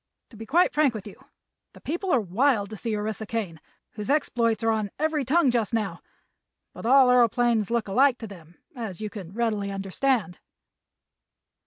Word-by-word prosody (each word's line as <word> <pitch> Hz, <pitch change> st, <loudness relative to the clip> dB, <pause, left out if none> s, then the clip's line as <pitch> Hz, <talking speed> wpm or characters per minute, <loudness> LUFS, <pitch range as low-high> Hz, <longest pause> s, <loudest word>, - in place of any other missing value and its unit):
To -, -, -14 dB
be 225 Hz, +1 st, -9 dB
quite 345 Hz, +5 st, +3 dB
frank 295 Hz, -6 st, +2 dB
with 210 Hz, -, -6 dB
you, 205 Hz, -, -12 dB, 0.5 s
the -, -, -14 dB
people 350 Hz, +5 st, -4 dB
are 255 Hz, -, +4 dB
wild 215 Hz, +2 st, +1 dB
to -, -, -5 dB
see 220 Hz, +1 st, -3 dB
Orissa 215 Hz, +1 st, -4 dB
Kane, 195 Hz, -9 st, -4 dB, 0.3 s
whose 210 Hz, +2 st, -7 dB
exploits 235 Hz, -6 st, +1 dB
are 225 Hz, -, +3 dB
on 215 Hz, -2 st, -1 dB
every 310 Hz, -1 st, 0 dB
tongue 280 Hz, +1 st, +3 dB
just 230 Hz, -2 st, 0 dB
now, 215 Hz, -3 st, -3 dB, 0.7 s
but -, -, -6 dB
all 265 Hz, 0 st, +6 dB
aëroplanes 240 Hz, -3 st, +3 dB
look 235 Hz, -2 st, -1 dB
alike 255 Hz, +5 st, +3 dB
to 225 Hz, -, -8 dB
them, 175 Hz, -4 st, -14 dB, 0.2 s
as 220 Hz, -7 st, -6 dB
you 215 Hz, -1 st, -5 dB
can 190 Hz, -6 st, -8 dB
readily 210 Hz, -2 st, -1 dB
understand." 195 Hz, +1 st, -1 dB
225 Hz, 175 wpm, -25 LUFS, 205-255 Hz, 0.7 s, all